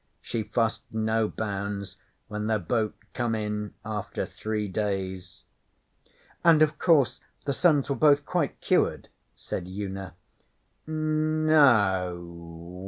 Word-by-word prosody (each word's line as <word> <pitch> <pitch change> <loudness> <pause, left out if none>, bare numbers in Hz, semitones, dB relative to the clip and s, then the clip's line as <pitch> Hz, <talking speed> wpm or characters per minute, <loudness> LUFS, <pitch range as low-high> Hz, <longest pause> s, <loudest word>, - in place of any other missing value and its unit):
She 115 - -3
fussed, 115 +1 0
no 110 0 +1
bounds, 100 -2 -4 0.3
when 105 0 -3
their 110 -1 +2
boat 110 +3 -1 0.2
come 120 -2 0
in 105 -1 -3
after 105 -2 -3
three 110 -1 -3
days.' 95 -2 -3 1.0
'And, 160 -2 +7
of 150 -1 0
course, 155 -8 +4 0.3
the 140 - 0
sons 150 -3 +3
were 140 - 0
both 145 -1 +4
quite 170 -5 -1
cured?' - - +1 0.3
said 90 - -5
Una. 95 -1 -5 0.7
'No 155 - +3
o. 85 0 -10
110 Hz, 115 wpm, -27 LUFS, 95-140 Hz, 1.0 s, And